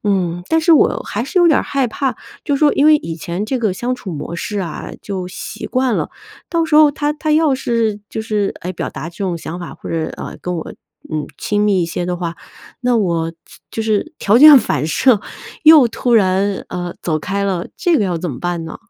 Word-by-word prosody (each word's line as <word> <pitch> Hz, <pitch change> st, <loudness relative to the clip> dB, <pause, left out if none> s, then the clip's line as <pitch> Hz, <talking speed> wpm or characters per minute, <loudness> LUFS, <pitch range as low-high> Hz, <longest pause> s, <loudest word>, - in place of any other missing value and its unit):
嗯， 175 Hz, -4 st, 0 dB
但 325 Hz, -, +3 dB
是 330 Hz, +1 st, +4 dB
我 310 Hz, -, +3 dB
还 220 Hz, +3 st, -3 dB
是 360 Hz, +7 st, +1 dB
有 345 Hz, -, +6 dB
点 310 Hz, -, +4 dB
儿 -, -, 0 dB
害 270 Hz, -3 st, 0 dB
怕， 265 Hz, +2 st, -2 dB, 0.3 s
就 285 Hz, -, +1 dB
说 295 Hz, +1 st, +4 dB
因 285 Hz, -, +3 dB
为 310 Hz, -, +7 dB
以 165 Hz, -, -6 dB
前 170 Hz, +5 st, -4 dB
这 255 Hz, +4 st, -2 dB
个 220 Hz, -5 st, 0 dB
相 245 Hz, +6 st, -2 dB
处 190 Hz, -8 st, -7 dB
模 160 Hz, +3 st, -5 dB
式 205 Hz, +3 st, -3 dB
啊， 170 Hz, -4 st, -6 dB
就 190 Hz, -3 st, -4 dB
习 185 Hz, -, -7 dB
惯 255 Hz, -3 st, 0 dB
了， -, -, -2 dB, 0.4 s
到 335 Hz, -1 st, +1 dB
时 315 Hz, -2 st, +2 dB
候 305 Hz, -1 st, +7 dB
他 295 Hz, 0 st, -1 dB
他 305 Hz, 0 st, -2 dB
要 310 Hz, -1 st, +3 dB
是， 230 Hz, -5 st, -1 dB
就 220 Hz, -, -4 dB
是， 210 Hz, -2 st, -1 dB
哎， 180 Hz, -, -4 dB
表 170 Hz, -, -4 dB
达 160 Hz, -, -6 dB
这 170 Hz, -, -15 dB
种 185 Hz, -3 st, -1 dB
想 165 Hz, +1 st, -6 dB
法， 175 Hz, -, -7 dB
或 -, -, -9 dB
者， 160 Hz, -1 st, -1 dB
呃， -, -, -7 dB
跟 180 Hz, -, -3 dB
我 160 Hz, -, -6 dB, 0.4 s
嗯， 155 Hz, -1 st, -1 dB
亲 205 Hz, 0 st, -1 dB
密 200 Hz, -3 st, +2 dB
一 -, -, -1 dB
些 175 Hz, +1 st, -3 dB
的 180 Hz, 0 st, -2 dB
话， 170 Hz, -1 st, -4 dB, 0.4 s
那 250 Hz, -1 st, +2 dB
我 170 Hz, -6 st, 0 dB
就 165 Hz, -, -21 dB, 0.3 s
就 -, -, -4 dB
是 220 Hz, +8 st, -1 dB
条 205 Hz, +3 st, +3 dB
件 300 Hz, 0 st, +10 dB
反 150 Hz, -, -1 dB
射 225 Hz, +6 st, +3 dB, 0.4 s
又 310 Hz, -5 st, +8 dB
突 240 Hz, +1 st, -2 dB
然， 195 Hz, -1 st, +2 dB
呃， 175 Hz, -1 st, -5 dB
走 160 Hz, -3 st, -1 dB
开 200 Hz, +5 st, -2 dB
了， 185 Hz, -3 st, -2 dB
这 345 Hz, -2 st, +2 dB
个 215 Hz, -, +1 dB
要 180 Hz, -3 st, -1 dB
怎 175 Hz, -, -3 dB
么 125 Hz, -5 st, -6 dB
办 175 Hz, -2 st, -2 dB
呢？ 160 Hz, -, -7 dB
205 Hz, 250 characters per minute, -18 LUFS, 175-265 Hz, 0.4 s, 件